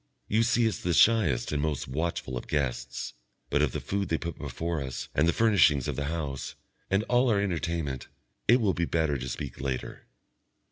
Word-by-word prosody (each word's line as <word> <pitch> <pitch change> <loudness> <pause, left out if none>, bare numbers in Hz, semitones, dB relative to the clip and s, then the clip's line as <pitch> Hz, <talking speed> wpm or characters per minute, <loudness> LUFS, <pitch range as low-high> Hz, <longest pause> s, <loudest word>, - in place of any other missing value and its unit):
You 110 +2 +2
see 115 0 +3
us 110 - -2
the 85 -2 0
shyest 110 - +4
and 75 -1 0
most 75 -2 -1
watchful 70 -1 -2
of - - -5
guests; 70 -5 -2 0.4
but 75 - +3
of 75 -4 +2
the - - -3
food 100 -2 -2
they 80 - +1
put 85 0 -5
before 80 +3 -3
us 65 -2 -5
and 75 +3 +3
the - - +5
furnishings 80 - +4
of - - -2
the 70 - -2
house, 75 -3 -4 0.3
and 95 +2 +2
all 125 +2 +3
our 105 -3 +3
entertainment, 85 -8 -2 0.4
it 120 +3 +6
will 105 -5 +2
be 85 - 0
better 80 -3 +1
to 65 +1 -4
speak 70 +1 -5
later. 65 -2 -4
80 Hz, 195 wpm, -28 LUFS, 70-100 Hz, 0.4 s, it